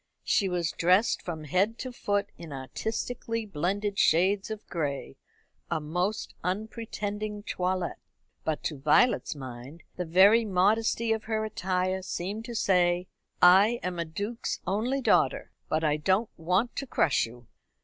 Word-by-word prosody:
She 195 - +2
was 175 -2 -1
dressed 185 +6 +3
from 160 -3 -5
head 190 - +1
to 255 - -5
foot 205 -4 -1
in 165 -3 -10
artistically 225 - -4
blended 200 +3 -2
shades 190 +5 +3
of 215 -1 -6
gray 140 - -3 0.5
a 170 - 0
most 180 +8 -2
unpretending 210 +1 -4
toilet. 185 -2 -2 0.5
But 155 -2 -2
to 150 -4 -3
Violet's 155 - +3
mind 130 +3 -9
the 180 - -2
very 195 +7 +6
modesty 220 +3 +2
of 220 -1 -4
her 220 -1 -1
attire 185 -2 -1
seemed 195 +4 -4
to 240 -1 -6
say: 180 -3 +2 0.3
"I 200 +7 +7
am 180 -1 -3
a 170 - -1
duke's 205 +8 -4
only 230 +9 0
daughter, - - +2 0.2
but 155 +1 0
I 150 -1 +2
don't 190 +8 +1
want 185 +8 0
to 275 - -3
crush 145 - +2
you." 120 +1 -14
190 Hz, 145 wpm, -28 LUFS, 170-215 Hz, 0.5 s, I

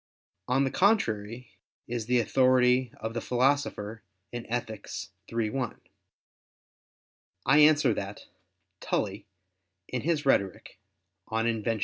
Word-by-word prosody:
On 130 +2 +2
the 135 - 0
contrary 120 - +1 0.4
is 115 -2 -3
the 125 0 +3
authority 125 0 +3
of 110 +1 -4
the 115 - -3
Philosopher 125 -4 0 0.3
in 120 -1 -7
Ethic. 115 -3 -4 0.4
iii, 115 -2 -1
1. 130 -2 -3 1.7
I 135 +4 +5
answer 150 -5 +6
that, 100 0 -6 0.5
Tully, 100 0 -2 0.6
in 125 - -3
his 155 0 0
Rhetoric 100 -8 0 0.5
(De 110 - -1
Invent. 115 -1 0
120 Hz, 110 wpm, -28 LUFS, 110-135 Hz, 1.7 s, answer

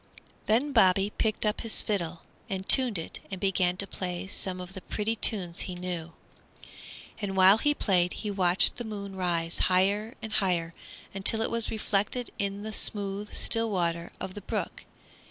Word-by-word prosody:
Then 245 +7 +2
Bobby 195 -4 +4
picked 220 -1 0
up 210 - 0
his 225 - +1
fiddle 175 -5 -2 0.3
and 190 0 -4
tuned 250 -6 +4
it 165 - -6
and 190 -2 -5
began 180 -2 +1
to 200 - -1
play 180 -1 -4
some 190 -1 -2
of 180 +1 -8
the 190 - -8
pretty 215 +4 -2
tunes 185 -6 +1
he 185 - 0
knew. 175 -2 -5 1.1
And 195 -2 -3
while 190 +3 +7
he 295 +3 +2
played 180 -7 +1
he 210 - -4
watched 185 -2 +2
the 240 - -4
moon 200 -3 -6
rise 170 -2 0
higher 200 +6 +2
and 220 -2 -6
higher 175 -5 +1 0.4
until 195 +3 +2
it - - -1
was 230 -1 +2
reflected 220 +3 -1
in 200 0 -2
the 220 0 -5
smooth, 200 0 -1
still 225 0 +1
water 170 -3 -1
of 185 - -5
the 205 - -8
brook. - - -4
195 Hz, 170 wpm, -28 LUFS, 180-215 Hz, 1.1 s, while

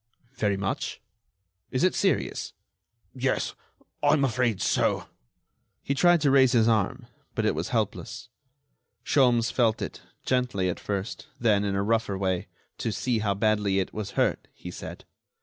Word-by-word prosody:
"Very 105 -6 0
much?... 100 0 -3 0.7
Is 130 - 0
it 185 - +4
serious?" 195 -3 0 0.6
"Yes, 130 0 -1 0.5
I 145 0 +4
am 140 -3 +3
afraid 120 -4 +1
so." - - +1 0.8
He 140 - 0
tried 175 +3 +4
to 145 -2 +3
raise 130 -2 +5
his 115 -2 +4
arm, 110 -4 +1 0.3
but - - 0
it - - +3
was - - -3
helpless. - - -2 0.8
Sholmes 120 -4 +3
felt 115 -3 +2
it, - - -5 0.2
gently 125 -8 +1
at 90 - -3
first, 100 +8 -4
then 105 -4 +3
in 100 -1 -1
a 100 - +1
rougher 110 -2 0
way, 95 -2 -1 0.3
"to 115 - -1
see 115 +3 0
how 100 -2 0
badly 105 -2 +2
it 95 - -1
was 105 -2 -5
hurt," - - +1
he - - -8
said. - - -8
115 Hz, 155 wpm, -27 LUFS, 100-130 Hz, 0.8 s, raise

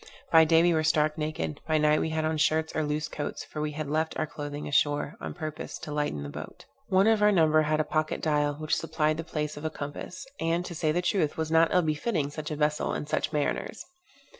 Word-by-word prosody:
By 160 -1 +8
day 165 +1 +5
we 175 0 +4
were 160 -1 +1
stark 155 -1 +2
naked; 150 - -3
by 155 -1 +3
night 150 0 +3
we - - -1
had 160 0 -1
on 160 0 0
shirts 160 +1 +1
or 155 - +1
loose 150 +1 -1
coats; 150 -1 -5
for 150 - -6
we 150 0 -2
had 155 0 -4
left 155 +2 -1
our 155 - 0
clothing 145 -1 -6
ashore, 145 +1 +1
on - - -5
purpose 155 -2 -5
to 150 - -8
lighten 145 - -1
the 70 - -6
boat. - - -9 0.2
One 190 +1 +4
of 220 -1 +4
our 210 0 +6
number 155 -4 +4
had 155 0 +1
a - - +3
pocket 155 +1 -1
dial, 150 -2 +1
which 155 +1 -1
supplied 155 -1 0
the 165 - -3
place 150 -2 -3
of 145 - -8
a 160 - 0
compass; 145 +5 -7
and, 170 +2 0
to 175 - -6
say 155 -1 0
the 175 +3 0
truth, 175 -5 +1
was 160 0 -2
not 165 0 +4
ill 180 -2 +4
befitting 155 -1 -1
such 150 0 -5
a 155 - -3
vessel 150 0 0
and 150 - -4
such 150 - -1
mariners. 150 -2 -2
155 Hz, 240 wpm, -28 LUFS, 150-160 Hz, 0.2 s, By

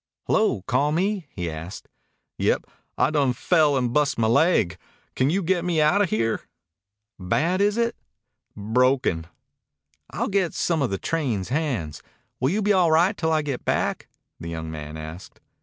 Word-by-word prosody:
"Hello! 130 - +1
Call 130 +5 +1
me?" 190 +1 -1
he 90 -3 -5
asked. 80 +4 -7 0.5
"Yep. - - +1 0.3
I - - +2
done 140 -5 +2
fell 150 +1 +2
and 125 -2 -1
bust 150 0 +2
my 115 - +2
laig. 130 - +3 0.4
Can 130 +1 +2
you 190 +4 0
get 175 0 +1
me 175 -3 0
outa 185 +7 +3
here?" 115 -4 0 0.8
"Bad, 165 - 0
is 205 +2 +2
it?" 235 0 0 0.6
"Broken." 110 -6 +1 0.8
"I'll - - -2
get 195 -4 0
some 165 -3 0
of 135 - +1
the 95 - -2
train 125 - -2
hands. 120 - -2 0.4
Will 130 - +1
you 205 +5 0
be 205 +1 +3
all 180 -4 +3
right 175 +6 +4
till 160 -3 -1
I 155 -1 +2
get 140 -4 -4
back?" - - -1 0.3
the 85 - -6
young 80 -1 -5
man 75 0 -7
asked. 80 +4 -9
140 Hz, 165 wpm, -24 LUFS, 105-175 Hz, 0.8 s, right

